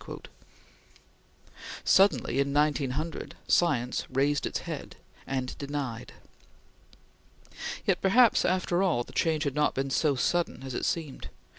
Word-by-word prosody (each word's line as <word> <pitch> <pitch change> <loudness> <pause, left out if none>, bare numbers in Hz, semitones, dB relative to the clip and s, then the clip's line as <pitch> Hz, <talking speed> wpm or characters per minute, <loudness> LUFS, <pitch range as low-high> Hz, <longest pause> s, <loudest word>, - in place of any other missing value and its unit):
Suddenly, 195 -7 +3
in 140 0 +1
1900, 150 +1 -1
science 125 -8 +2
raised 140 +2 +1
its - - -2
head - - -7 0.3
and 130 -2 -3
denied. 140 -5 -5 1.7
Yet, - - +1
perhaps, 230 +5 +5
after 180 -1 +1
all, 170 -11 +2
the - - -15
change 160 -2 +1
had 140 -4 -1
not 150 +1 +1
been 135 0 -2
so 145 +1 +2
sudden 165 0 0
as 135 -1 -6
it - - -2
seemed. 155 -5 -4
145 Hz, 120 wpm, -28 LUFS, 135-170 Hz, 1.7 s, perhaps